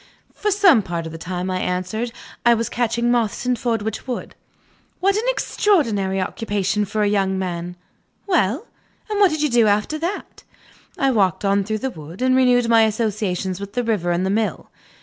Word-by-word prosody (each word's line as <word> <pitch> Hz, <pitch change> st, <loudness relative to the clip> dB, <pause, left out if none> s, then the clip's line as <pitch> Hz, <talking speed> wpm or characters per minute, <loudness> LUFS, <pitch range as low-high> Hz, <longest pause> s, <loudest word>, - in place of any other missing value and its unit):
"For 420 Hz, -, -1 dB
some 385 Hz, -, +5 dB
part 170 Hz, -3 st, -4 dB
of 160 Hz, -, -6 dB
the 165 Hz, -, -8 dB
time," 180 Hz, +2 st, -3 dB
I 185 Hz, -, -1 dB
answered, 185 Hz, +6 st, -2 dB, 0.3 s
"I 235 Hz, 0 st, +5 dB
was 230 Hz, 0 st, -2 dB
catching 240 Hz, 0 st, 0 dB
moths 235 Hz, -1 st, 0 dB
in 250 Hz, 0 st, +2 dB
Fordwitch 225 Hz, -1 st, -2 dB
Wood." 250 Hz, -, -4 dB, 0.7 s
"What 395 Hz, +2 st, +2 dB
an 435 Hz, +3 st, -1 dB
extraordinary 230 Hz, -, +1 dB
occupation 205 Hz, +1 st, -1 dB
for 210 Hz, +2 st, -1 dB
a -, -, +2 dB
young 195 Hz, -2 st, +1 dB
man! 175 Hz, -1 st, -4 dB, 0.5 s
Well? 315 Hz, -, +1 dB, 0.5 s
And 415 Hz, -, 0 dB
what 400 Hz, -2 st, +6 dB
did 310 Hz, -1 st, -2 dB
you 300 Hz, -, +2 dB
do 235 Hz, -2 st, +4 dB
after 210 Hz, +9 st, +1 dB
that?" 350 Hz, +6 st, -5 dB, 0.5 s
"I 275 Hz, -5 st, +2 dB
walked 200 Hz, -5 st, +1 dB
on 200 Hz, 0 st, +2 dB
through 215 Hz, +2 st, -2 dB
the 265 Hz, -, -1 dB
wood, 165 Hz, +6 st, -8 dB
and 255 Hz, 0 st, +3 dB
renewed 250 Hz, -2 st, +4 dB
my 230 Hz, -1 st, +5 dB
old -, -, +2 dB
associations 205 Hz, -4 st, -2 dB
with 200 Hz, 0 st, -7 dB
the 245 Hz, -, 0 dB
river 210 Hz, -7 st, 0 dB
and 175 Hz, +2 st, +1 dB
the 190 Hz, -, 0 dB
mill." 215 Hz, +1 st, -2 dB
220 Hz, 190 wpm, -21 LUFS, 190-250 Hz, 0.7 s, what